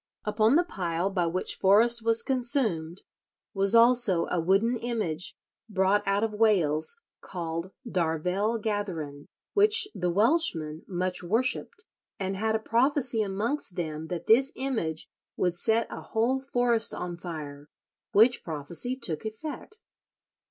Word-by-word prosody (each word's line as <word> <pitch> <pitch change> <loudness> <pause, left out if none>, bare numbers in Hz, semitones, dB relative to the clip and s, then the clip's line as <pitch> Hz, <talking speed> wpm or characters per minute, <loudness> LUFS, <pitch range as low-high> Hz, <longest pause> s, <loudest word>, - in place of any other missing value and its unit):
Upon 215 +4 +2
the 345 - +4
pile 180 - -3
by 180 -3 0
which 180 +3 -2
Forrest 225 +4 +3
was 230 0 +2
consumed 235 - 0 0.5
was 195 +2 +4
also 230 -7 +5
a 175 - +1
wooden 195 +8 +2
image, 215 -9 -2 0.3
brought 195 0 +2
out 200 +2 +1
of 225 -1 -1
Wales, 205 - +2 0.2
called 170 0 -5 0.2
"Darvell 180 +4 -1
Gatheren," 170 -10 -4 0.3
which 420 0 +5
the 180 - -2
Welshmen 175 - +2
"much 180 0 -1
worshipped, 255 - -1 0.3
and 195 0 -2
had 220 +2 0
a - - +3
prophecy 240 +1 +1
amongst 210 +3 -3
them 160 -2 -4
that 175 0 -5
this 265 +5 +4
image 220 -13 -3 0.3
would 180 -1 0
set 225 +5 +1
a - - -7
whole 235 +4 0
forest 245 -4 +1
on 175 -1 -5
fire, 150 -4 -8 0.4
which 230 +4 +4
prophecy 165 - -3
took 165 - -2
effect." 300 - -7
205 Hz, 130 wpm, -27 LUFS, 170-235 Hz, 0.5 s, also